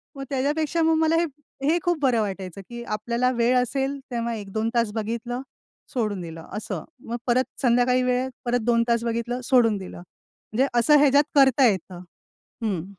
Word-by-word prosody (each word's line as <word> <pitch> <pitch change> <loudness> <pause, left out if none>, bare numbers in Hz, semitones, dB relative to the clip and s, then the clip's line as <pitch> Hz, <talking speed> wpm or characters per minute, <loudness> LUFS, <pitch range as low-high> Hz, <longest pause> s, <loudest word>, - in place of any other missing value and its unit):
मग 275 - -6
त्याच्यापेक्षा 295 +5 0
मग 320 0 +3
मला 320 +1 +3
हे 335 - +3 0.4
हे 315 +5 +3
खूप 350 -3 +1
बरं 250 -5 +3
वाटायचं, 190 -2 -5
की 240 0 -7
आपल्याला 235 +3 -1
वेळ 240 +1 +2
असेल 270 +3 -1
तेव्हा 235 -1 -2
1-2 220 +1 -3
तास 230 -3 +2
बघितलं 235 +3 -3 0.5
सोडून 210 -6 -1
दिलं 165 -1 -9
असं. 210 - -4 0.2
मग 235 +1 -3
परत 250 +2 +3 0.2
संध्याकाळी 250 0 +3
वेळ 250 +1 0 0.2
परत 245 0 +1
2 230 0 +3
तास 235 0 +1
बघितलं 235 +2 -2
सोडून 235 -5 +4
दिलं. 190 - -8
म्हणजे 220 +7 -4
असं 295 +5 +5
ह्याच्यात 285 0 +5
करता 270 -1 +5
येतं. 185 -3 -2 0.6
हं. 190 -7 -1
240 Hz, 165 wpm, -24 LUFS, 220-265 Hz, 0.6 s, असं